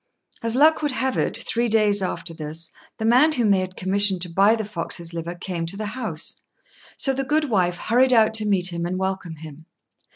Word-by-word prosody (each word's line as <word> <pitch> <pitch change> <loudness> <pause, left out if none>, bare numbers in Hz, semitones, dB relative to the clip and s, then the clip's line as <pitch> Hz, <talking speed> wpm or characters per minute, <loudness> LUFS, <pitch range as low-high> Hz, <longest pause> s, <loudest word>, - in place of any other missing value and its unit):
As 230 0 0
luck 310 +4 +5
would 295 -3 -1
have 260 0 -1
it, - - -1
three 235 +1 -1
days 210 -2 +2
after 180 -2 -3
this 160 +1 -5 0.3
the 220 - -3
man 255 +7 +5
whom 235 -7 +2
they 195 - +4
had 185 0 -5
commissioned 195 0 +2
to 180 - -5
buy 195 +6 +4
the 220 -2 -4
fox's 170 -3 -6
liver 170 +1 -5
came 175 -2 -4
to 195 +4 -3
the 215 - -4
house; 215 -11 -2 0.6
so 270 - +2
the 270 +1 -2
goodwife 240 - +1
hurried 255 +3 +2
out 220 -2 +4
to 215 -1 +1
meet 185 -3 +1
him 170 0 -3
and 185 +1 -3
welcome 190 -3 -3
him. 155 0 -12
200 Hz, 205 wpm, -23 LUFS, 175-230 Hz, 0.6 s, luck